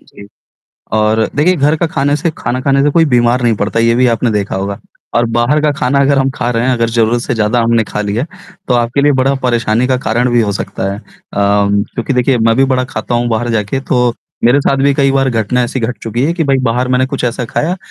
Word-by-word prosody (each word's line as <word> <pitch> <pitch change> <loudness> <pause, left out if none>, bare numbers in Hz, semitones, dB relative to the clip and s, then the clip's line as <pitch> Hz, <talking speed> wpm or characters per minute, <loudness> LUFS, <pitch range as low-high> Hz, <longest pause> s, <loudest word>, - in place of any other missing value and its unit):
जी 100 - -15 0.7
और 110 +1 +1
देखिए, 165 +6 +3
घर 150 +2 +2
का 170 - 0
खाने 145 -2 0
से 170 +1 -1
खाना 125 +1 -2
खाने 135 +1 +2
से 145 - +2
कोई 165 +3 +3
बीमार 120 +1 +2
नहीं 120 -2 +2
पड़ता, 105 +3 -2
ये 115 0 +3
भी 125 +1 +3
आपने 115 0 +1
देखा 100 -2 -2
होगा 100 +1 -3 0.4
और 120 - +3
बाहर 120 +6 +1
का 150 - +2
खाना 140 -1 0
अगर 140 0 +3
हम 135 0 +1
खा 120 -1 -2
रहे 115 0 0
हैं, 130 - +2
अगर 115 -1 0
ज़रूरत 115 +1 +1
से 125 - -2
ज़्यादा 110 +2 +1
हमने 115 0 +2
खा 105 - -5
लिया, 105 +5 -2 0.4
तो 125 - +2
आपके 120 +3 +1
लिए 145 - +4
बड़ा 135 +2 +2
परेशानी 120 -1 +1
का 130 - +1
कारण 120 +1 0
भी 120 - +3
हो 105 -3 0
सकता 100 0 -4
है। 100 - -6 0.4
अम, 100 0 +2
चूँकि 120 +3 -2
देखिए 125 0 +2
मैं 115 0 +2
भी 135 - +4
बड़ा 130 0 +1
खाता 125 -2 -4
हूँ 120 0 0
बाहर 115 +1 -1
जाके, 110 +4 -1
तो 125 -3 0 0.3
मेरे 130 +4 +4
साथ 135 - +1
भी 140 - +4
कई 135 -1 +2
बार 135 0 +1
घटना 115 +2 0
ऐसी 130 +1 -4
घट 120 +2 -3
चुकी 115 +2 -2
है 160 - +1
कि, 170 -2 -1
भाई 135 -1 +2
बाहर 125 +1 0
मैंने 130 0 +2
कुछ 135 0 -4
ऐसा 125 +1 -2
खाया 165 +9 -2
120 Hz, 250 wpm, -13 LUFS, 115-135 Hz, 0.7 s, लिए